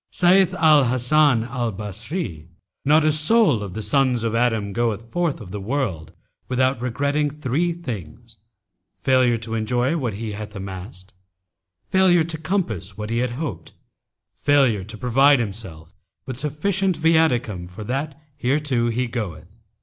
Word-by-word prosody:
Saith 185 0 +3
Al 155 -4 +5
Hasan 125 +1 +3
al 120 -1 -3
Basrí,[FN#283] 105 - -5 0.4
Not 150 +2 +5
a 155 - +4
soul 155 - +3
of 100 -2 -6
the 110 - -4
sons 130 -3 +2
of 115 -1 -1
Adam 115 -4 0
goeth 115 0 -2
forth 175 -4 -1
of 100 -6 -10
the 105 0 -5
world 100 - -3 0.4
without 130 0 +1
regretting 140 +4 0
three 150 +4 -1
things, 120 - -8 0.7
failure 130 -3 +3
to 115 0 -6
enjoy 120 +6 0
what 125 -10 -2
he 110 +1 -5
hath 105 +1 -7
amassed, 95 0 -8 0.7
failure 185 -3 +4
to 160 -1 -4
compass 155 - -2
what 105 +1 -5
he 115 - 0
hoped, 125 - -4 0.7
failure 135 -9 +3
to 110 +3 -9
provide 135 +5 +4
himself 95 -8 -6 0.3
with 130 - -5
sufficient 175 +7 -1
viaticum 125 - +1
for 105 +4 -9
that 140 +6 -3 0.2
hereto 130 -3 +1
he 125 +2 -1
goeth. 105 -10 -5
125 Hz, 140 wpm, -22 LUFS, 105-150 Hz, 0.7 s, Al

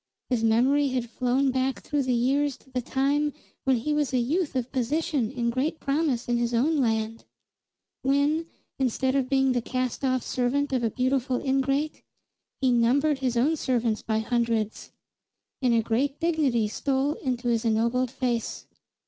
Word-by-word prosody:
His 235 -3 +1
memory 260 +6 +3
had 255 -2 -2
flown 260 +2 +1
back 260 +1 -1
through 295 -1 0
the 255 -2 +1
years 270 +3 +1
to 265 - -24
the 255 -1 -1
time 285 +4 0 0.3
when 265 -1 +4
he 295 +6 -1
was 295 -2 0
a - - +4
youth 290 +6 0
of 255 -1 -2
position 270 -1 0
and 235 -1 +1
great 285 +6 -1
promise 275 -4 0
in 240 0 +1
his 235 0 0
own 300 +7 +2
land; 225 -3 0 0.8
when, 285 +4 +1 0.3
instead 260 0 +1
of 270 -2 0
being 270 -1 +3
the 245 -1 +1
cast 255 +2 -3
off 255 -2 +1
servant 270 +3 0
of 250 -2 +1
a 230 - +2
beautiful 255 +1 0
ingrate, 275 +3 0 0.6
he 260 -1 +3
numbered 265 +5 +3
his 250 -3 -1
own 290 +7 +3
servants 240 -6 0
by 220 -1 -1
hundreds. 225 -1 -1 0.7
And 250 -2 +3
a 225 - +2
great 270 +6 0
dignity 290 -10 +1
stole 270 +6 0
into 250 -4 -2
his 230 -1 +1
ennobled 235 +3 +1
face. 240 -3 -2
255 Hz, 165 wpm, -26 LUFS, 235-280 Hz, 0.8 s, when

